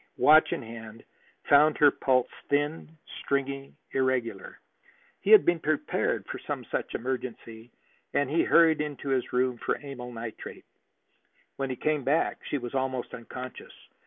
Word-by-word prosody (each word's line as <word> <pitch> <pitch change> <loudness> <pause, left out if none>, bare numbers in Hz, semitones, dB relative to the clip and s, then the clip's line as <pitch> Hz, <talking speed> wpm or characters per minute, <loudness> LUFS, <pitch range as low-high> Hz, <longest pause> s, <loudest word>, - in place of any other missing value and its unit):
watch 155 +1 +6
in - - -2
hand, 115 -1 -10 0.5
found 150 +2 +6
her 145 -1 +6
pulse 130 -2 +1 0.2
thin, 145 +3 -1 0.3
stringy, 140 0 -2 0.2
irregular. 130 -3 -1 0.6
He - - -3
had 435 - +9
been 175 -1 +2
prepared 155 -1 -1
for - - -6
some - - -3
such - - -3
emergency, 120 -2 -5 0.4
and 145 - +2
he 160 +4 +2
hurried 160 -2 +5
into 145 -2 -5
his 130 -2 0
room 125 -1 +1
for - - 0
amyl 125 -3 -7
nitrate. 115 -1 -8 0.9
When 135 -1 -2
he 130 - -2
came 150 +2 -1
back 145 +5 +1
she 145 - 0
was 120 -2 -6
almost 130 -2 -2
unconscious. 125 +2 -8
135 Hz, 145 wpm, -28 LUFS, 125-145 Hz, 0.9 s, had